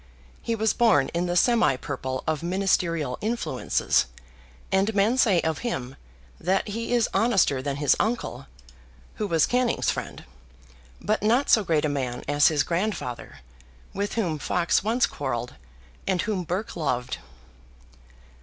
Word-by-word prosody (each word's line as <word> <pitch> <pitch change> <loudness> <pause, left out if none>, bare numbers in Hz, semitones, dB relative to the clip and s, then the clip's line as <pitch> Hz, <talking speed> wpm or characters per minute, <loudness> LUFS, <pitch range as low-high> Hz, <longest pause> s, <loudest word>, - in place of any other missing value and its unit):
He 230 - -1
was 220 0 +1
born 215 - +3
in 175 +1 -1
the 175 - -1
semi 235 - +4
purple 130 -1 -4
of 160 -1 -1
ministerial 170 -6 0
influences, 210 - 0 0.6
and 200 +3 +1
men 210 +5 +3
say 200 -9 +4
of 160 -1 -1
him 135 - -4 0.4
that 190 +4 0
he 230 +3 -4
is 240 -2 +3
honester 195 - +2
than 140 0 -2
his 145 0 +3
uncle, 230 +3 -2 0.7
who 210 - -1
was 165 -4 +3
Canning's 250 -1 +1
friend, - - -6 0.8
but 215 +1 -1
not 235 +7 +2
so 220 - +5
great 160 -4 +1
a - - +2
man 130 -4 -3
as 145 +1 +4
his 150 -2 +2
grandfather, 170 - -3 0.5
with 200 +1 -3
whom 175 -10 -1
Fox 175 +4 +1
once 230 +4 +2
quarrelled, 125 -4 -4 0.5
and 185 -2 +1
whom 205 -4 -2
Burke 185 +6 -3
loved. 130 -7 -2
180 Hz, 145 wpm, -25 LUFS, 145-220 Hz, 0.8 s, so